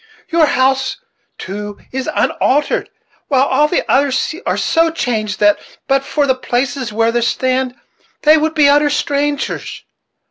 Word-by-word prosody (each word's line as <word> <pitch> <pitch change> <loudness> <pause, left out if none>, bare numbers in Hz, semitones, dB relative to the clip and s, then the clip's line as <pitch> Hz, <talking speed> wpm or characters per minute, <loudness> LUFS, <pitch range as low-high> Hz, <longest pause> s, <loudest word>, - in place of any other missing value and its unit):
Your 330 -2 +3
house, 265 0 +1 0.4
too, 205 +2 -6
is 265 0 -3
unaltered, 290 +3 0 0.4
while 265 -2 +3
all 300 +1 +2
the 350 - -1
others 270 +2 +1
are - - 0
so 330 0 +2
changed 220 -10 -2
that, 205 0 +4 0.3
but 275 0 +2
for 290 +1 0
the 265 - +3
places 255 -1 -2
where 225 +2 +1
they 240 0 0
stand, 255 +1 0 0.5
they 305 +1 +7
would 315 +1 0
be 295 -2 +5
utter 290 +1 +4
strangers. 290 0 -2
265 Hz, 145 wpm, -16 LUFS, 245-290 Hz, 0.5 s, they